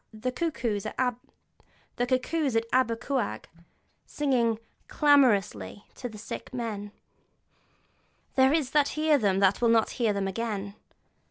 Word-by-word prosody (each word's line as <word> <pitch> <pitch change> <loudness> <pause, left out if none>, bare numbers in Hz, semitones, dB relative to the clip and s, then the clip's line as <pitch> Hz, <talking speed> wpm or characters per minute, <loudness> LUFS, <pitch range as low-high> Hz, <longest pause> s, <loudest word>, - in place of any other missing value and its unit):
The 225 +3 -3
cuckoos 245 - -2
at - - -7 1.8
Aber 255 -3 +3
Cuawg, 230 - -3 0.6
singing 245 -6 +1 0.3
'clamorously' 210 - +2
to 245 - -6
the 215 - -11
sick 210 - -7
man: 220 -5 -4 1.4
'there 265 0 +4
are 315 0 +3
that 285 +2 +2
hear 305 -1 +3
them 200 -4 +2
that 195 +2 +3
will 235 - +4
not 225 -1 +3
hear 230 -3 0
them 200 -1 -1
again!' 205 -1 -3
230 Hz, 115 wpm, -27 LUFS, 205-265 Hz, 1.8 s, there